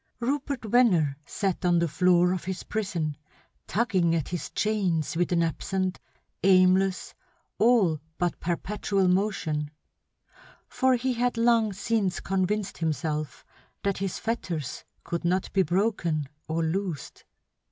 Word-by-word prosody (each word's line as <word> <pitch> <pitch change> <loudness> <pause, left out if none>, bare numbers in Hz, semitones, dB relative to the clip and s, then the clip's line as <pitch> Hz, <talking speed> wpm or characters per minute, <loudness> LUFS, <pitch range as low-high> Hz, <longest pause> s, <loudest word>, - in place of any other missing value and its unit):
Rupert 270 0 -2
Venner 200 - +3
sat 195 -1 -2
on 175 -1 +3
the 170 0 +2
floor 180 +3 +3
of 180 -2 -4
his 190 0 -4
prison, 170 -9 -2 0.5
tugging 185 -7 +1
at 160 -4 -2
his 175 -2 -4
chains 190 -9 0
with 175 +2 0
an 170 -1 +3
absent, 185 +3 -2 0.4
aimless, 185 0 +3 0.5
all 215 -9 +4 0.2
but 175 -2 -1
perpetual 195 +2 -1
motion; 180 -6 0 1.0
for 260 0 +2
he 255 +1 0
had 245 0 0
long 230 -2 +3
since 200 -1 -1
convinced 195 +2 -1
himself 155 -2 -2 0.4
that 200 -2 0
his 195 -2 -2
fetters 175 - -3 0.2
could 170 0 -3
not 180 +2 0
be 195 - +4
broken 175 -4 0 0.2
or 160 +1 -1
loosed. 170 -3 -3
185 Hz, 125 wpm, -27 LUFS, 170-210 Hz, 1.0 s, all